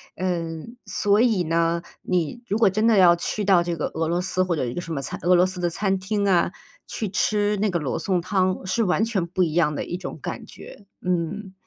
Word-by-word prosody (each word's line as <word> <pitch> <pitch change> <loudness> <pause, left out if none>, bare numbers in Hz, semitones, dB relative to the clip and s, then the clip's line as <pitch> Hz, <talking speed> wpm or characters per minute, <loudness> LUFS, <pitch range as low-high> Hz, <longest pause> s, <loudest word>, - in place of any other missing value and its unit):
嗯， 175 +3 -3
所 205 +1 +2
以 225 -7 +3
呢， 165 +1 +1 0.2
你 180 +6 -1
如 210 - 0
果 225 -3 +5
真 215 +4 0
的 225 -2 +4
要 175 -2 +7
去 200 +4 -3
到 185 -3 +5
这 170 0 -2
个 150 - -1
俄 160 0 -1
罗 175 +2 0
斯 185 0 0
或 180 -2 -1
者 145 - -1
一 120 - -4
个 175 - -4
什 170 - -8
么 140 - -2
餐 135 - -5
俄 180 +1 +5
罗 180 +1 +5
斯 185 -1 -4
的 175 - 0
餐 195 +3 0
厅 200 +1 -1
啊， 175 -3 +3 0.4
去 220 - -3
吃 210 +1 +1
那 210 +1 +1
个 175 -2 0
罗 145 -4 -2
宋 185 +1 0
汤 185 +1 0
是 225 +5 +1
完 195 +2 +2
全 210 -6 -1
不 185 +2 0
一 160 -3 -1
样 160 -3 +2
的 - - -3
一 175 - -4
种 185 - -7
感 - - -5
觉， 200 - -13 0.2
嗯。 180 +3 -2
185 Hz, 255 characters per minute, -24 LUFS, 170-200 Hz, 0.4 s, 要